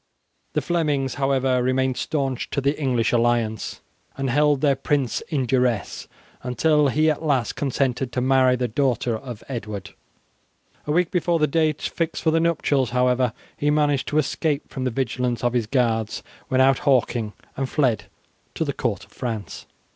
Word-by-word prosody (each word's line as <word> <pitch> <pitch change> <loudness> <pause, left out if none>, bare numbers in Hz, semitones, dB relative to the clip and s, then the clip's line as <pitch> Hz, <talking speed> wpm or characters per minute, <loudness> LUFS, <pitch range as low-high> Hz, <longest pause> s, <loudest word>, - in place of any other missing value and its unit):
The - - 0
Flemings, 150 -7 0
however, 135 -2 +2
remained 130 +1 +1
stanch 135 -5 -2
to - - -1
the 140 +2 +1
English 125 -4 +1
alliance, 115 -2 0 0.4
and 135 -2 -1
held 145 0 +3
their 140 -2 +3
prince 135 -1 0
in 140 -6 0
duresse 125 -4 0 0.3
until 150 +4 +2
he 155 +4 +3
at 150 - -4
last 135 -8 0
consented 135 -2 -1
to - - 0
marry 130 0 +4
the 125 0 -1
daughter 125 -1 0
of 120 -1 -8
Edward. 105 -6 -5 1.0
A - - 0
week 170 +2 +2
before 175 -1 +1
the 155 - +3
date 155 0 0
fixed 165 -1 -2
for 160 - +3
the 165 - +3
nuptials, 150 -6 +1
however, 125 0 +2 0.2
he 145 - 0
managed 145 -2 +2
to 150 - -1
escape 150 0 -1
from 130 -1 -4
the - - +2
vigilance 125 0 -2
of 120 0 +1
his 120 -3 0
guards 115 -3 0 0.2
when 130 0 +2
out 135 -1 +4
hawking, 120 -5 +1 0.2
and 135 -1 -2
fled 130 -8 +1 0.5
to - - -1
the - - -2
court - - -2
of - - -28
France. 115 -7 -5
130 Hz, 170 wpm, -23 LUFS, 120-145 Hz, 1.0 s, marry